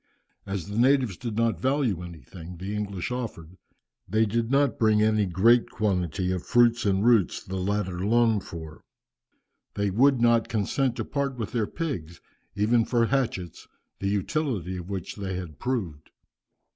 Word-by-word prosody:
As 95 -3 -3
the 105 +2 -3
natives 130 -5 +3
did 115 +2 -5
not 115 0 0
value 130 - +1
anything 85 +1 -10
the 95 +4 -5
English 100 -2 -3
offered, 100 -9 -5 0.5
they 110 +3 +3
did 115 +2 -1
not 140 -3 +2
bring 110 -1 +4
any 110 -2 +2
great 115 +7 +4
quantity 95 -3 -1
of 90 -1 -2
the - - -20
fruits 120 -2 +4
and 100 +1 +2
roots 115 -8 +3
the 95 +1 -5
latter 95 -1 -1
longed 115 -1 +3
for. 80 -2 -9 0.9
They 100 -1 0
would 130 +5 +4
not 115 -1 +3
consent 120 +4 0
to - - -3
part 140 -2 -2
with 110 -3 -4
their 115 -4 0
pigs 100 - -5 0.4
even 115 +3 +3
for 120 0 +2
hatchets, 115 - -2 0.3
the 100 - -2
utility 100 - -1
of 90 +1 -8
which 95 -1 -5
they 95 -2 -4
had 85 -6 -7
proved. 90 - -3
105 Hz, 160 wpm, -26 LUFS, 95-120 Hz, 0.9 s, bring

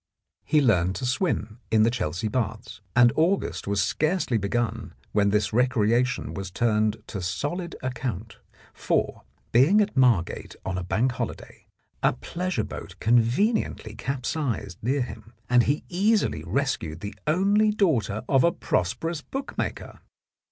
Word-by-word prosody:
He 150 0 +3
learned 95 -6 +3
to 130 - -3
swim 125 - -1
in 110 -1 +4
the 115 - +3
Chelsea 110 -3 -2
Baths, 110 -1 -3
and 120 -1 +6
August 175 - 0
was 100 -2 +1
scarcely 155 - 0
begun 115 +4 -2 0.2
when 100 -1 +3
this 105 +1 +1
recreation 125 0 +1
was 95 -1 -5
turned 110 +1 +1
to 100 - -5
solid 145 - -3
account, 125 -5 -4 0.3
for, - - -1 0.3
being 140 - +5
at 210 -1 +1
Margate 120 -10 +2
on 95 -1 -2
bank 110 +9 +1
holiday, 120 - -6 0.3
a - - +3
pleasure 180 - -3
boat - - -8
conveniently 120 - +1
capsized 125 - -3
near 130 +4 +1
him, 110 -1 -10
and 125 +1 +5
he 145 +5 0
easily 205 +4 +1
rescued 130 - -1
the 100 0 -5
only 200 +7 +3
daughter 125 - +1
of 135 -2 +4
a 170 - +4
prosperous 145 - -1
bookmaker. 270 - -5
120 Hz, 135 wpm, -26 LUFS, 105-150 Hz, 0.3 s, and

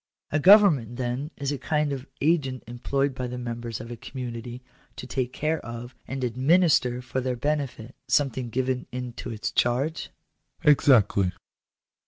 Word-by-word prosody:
" - - -66
A 155 - +2
government, 160 - +6
then, 125 +3 -3
is 140 -1 -2
a 145 - -3
kind 150 +2 0
of 135 0 -6
agent 140 -5 +1
employed 135 +4 -1
by 125 -1 -4
the 125 +1 -5
members 120 -2 -5
of 115 +1 -8
a - - -4
community, 120 0 -7 0.3
to - - -7
take 130 -1 -2
care 155 +4 -1
of, 120 +2 -7
and 130 0 -4
administer 130 0 +3
for 130 +1 -2
their 130 0 -1
benefit, 135 -3 -3
something 130 -2 +1
given 130 +2 -1
into 125 -1 -6
its 110 -2 -3
charge? 130 +7 0 0.2
" - - -51
" - - -33
Exactly." 105 -10 +4
130 Hz, 165 wpm, -26 LUFS, 120-140 Hz, 0.3 s, government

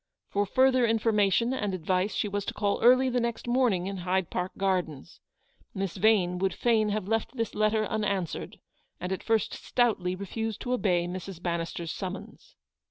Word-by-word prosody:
For 205 0 0
further 260 +2 +4
information 225 +1 +2
and 205 -7 -1
advice 185 +3 0
she - - 0
was 205 0 -2
to - - -4
call 205 -1 0
early 255 +2 +6
the 250 -1 +1
next 235 0 -3
morning 240 -8 +2
in 195 0 -4
Hyde 185 0 -1
Park 180 +1 -2
Gardens. 180 -8 -2 0.6
Miss 195 -2 -3
Yane 190 -3 +3
would 190 0 0
fain 220 -3 +2
have 205 -2 -2
left 225 +4 -1
this 230 -2 -2
letter 215 +1 +2
unanswered, 200 -5 -2 0.4
and 180 - -4
at 190 - -2
first 225 -2 +1
stoutly 195 -7 0
refused 220 +3 -4
to 250 - -2
obey 180 -7 +1
Mrs. 185 0 -6
Bannister's 170 -1 -3
summons. 190 0 -7
200 Hz, 165 wpm, -28 LUFS, 185-225 Hz, 0.6 s, early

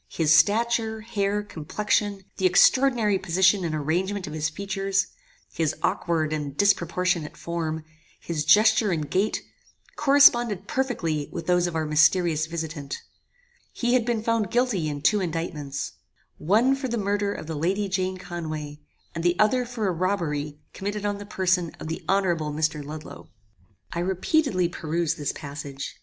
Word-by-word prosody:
His 155 -1 +3
stature, 220 +5 +2
hair, 210 -2 -1
complexion, 205 +3 -1
the 190 - +3
extraordinary 225 +1 +4
position 190 +2 +3
and 160 -2 -2
arrangement 180 +6 -1
of 150 - -7
his 155 0 -1
features, 195 +3 -1 0.5
his 160 -3 0
aukward 160 -4 0
and 145 -2 -4
disproportionate 180 -4 +1
form, 160 -2 -4 0.3
his 160 -3 -3
gesture 215 +3 +5
and 155 -4 -1
gait, 195 +8 0 0.5
corresponded 240 -8 +5
perfectly 195 - -1
with 165 - -5
those 180 +1 +2
of 170 - -5
our 160 -1 0
mysterious 160 +1 +3
visitant. 160 -4 -5 0.7
He 240 0 0
had 255 -2 +4
been 230 -2 -1
found 225 -3 0
guilty 240 -10 +1
in 145 -1 -5
two 210 - +4
indictments. 160 -5 -3 0.5
One 225 - +3
for 270 -1 -4
the 235 -1 -2
murder 205 0 0
of - - -6
the 160 - -5
Lady 185 +7 0
Jane 185 0 -1
Conway, 155 -5 -6 0.3
and 165 - -4
the 175 0 +2
other 245 +3 +2
for 230 -4 -2
a - - +2
robbery 160 -5 -2 0.2
committed 205 +1 -4
on 205 0 -1
the 205 - -9
person 185 -4 0
of 155 - -6
the 165 - -5
honorable 175 -6 +1
Mr. 150 0 -1
Ludloe. 155 +2 -9 0.6
"I 170 - -3
repeatedly 185 - +1
perused 170 -1 -2
this 145 -2 -2
passage. 140 -2 -7
180 Hz, 150 wpm, -25 LUFS, 155-205 Hz, 0.7 s, gesture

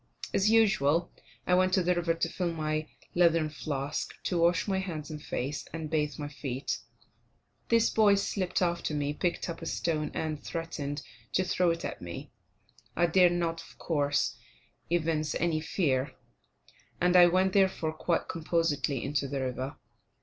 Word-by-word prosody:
As 200 +2 +3
usual, 175 -8 +3 0.3
I 180 - +2
went 185 +1 +4
to 185 - +2
the 180 +1 +3
river 170 -1 0
to 165 - 0
fill 175 0 -2
my 155 -1 -2 0.3
leathern 165 -3 +4
flask, 140 0 -3
to 175 - 0
wash 170 +3 +3
my 190 -1 +1
hands 160 -6 -5
and 150 -1 -6
face, 140 +2 -3
and 160 -1 -5
bathe 150 -2 0
my 145 - -4
feet. 140 -2 -4 0.9
This 230 -1 +4
boy 210 -2 +5
slipped 190 -2 0
after 170 -3 -1
me, 145 0 -1
picked 175 +3 -1
up 170 -1 -5
a 165 - -5
stone, 155 -3 -1
and 155 -2 -3
threatened 150 -3 -4 0.3
to 185 - +3
throw 180 -1 +2
it 165 0 -1
at - - -5
me. 85 -1 -7 0.6
I 175 - +3
dare 180 +1 +5
not, 170 -1 -1
of - - -15
course, 145 -3 0 0.5
evince 160 -2 0
any 160 -2 +1
fear; 140 -6 0 0.9
and 180 +1 +3
I 175 -1 +9
went, 185 +2 +2
therefore, 190 -5 +2
quite 165 +2 -1
composedly 155 -5 0
into 140 0 -1
the 135 0 -3
river. 130 +1 -3
165 Hz, 165 wpm, -29 LUFS, 150-180 Hz, 0.9 s, I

